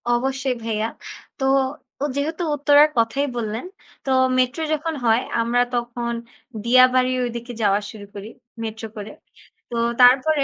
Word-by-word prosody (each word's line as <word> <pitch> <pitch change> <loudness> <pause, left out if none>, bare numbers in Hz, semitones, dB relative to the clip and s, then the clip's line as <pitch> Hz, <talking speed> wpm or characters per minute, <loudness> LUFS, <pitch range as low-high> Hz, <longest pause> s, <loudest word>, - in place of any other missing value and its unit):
অবশ্যই 265 +2 0
ভাইয়া। 220 -1 -1 0.5
তো 265 - 0 0.6
ও - - +2
যেহেতু 315 +5 -2
উত্তরার 290 +1 +5
কথাই 230 +5 +1
বললেন। 220 +2 -3 0.4
তো 270 - -1 0.3
মেট্রো 255 +5 +1
যখন 315 +2 -2
হয় 225 +1 +4 0.2
আমরা 235 +1 +1
তখন 240 0 -3 0.5
দিয়াবাড়ির 255 +1 +4
ঐদিকে 235 +1 -7
যাওয়া 200 -1 +3
শুরু 210 -2 -10
করি 205 +1 -8 0.3
মেট্রো 225 0 -5
করে। 210 0 -7 0.6
তো 240 - -6 0.3
তারপরে 270 +4 +5
245 Hz, 130 wpm, -22 LUFS, 225-275 Hz, 0.6 s, উত্তরার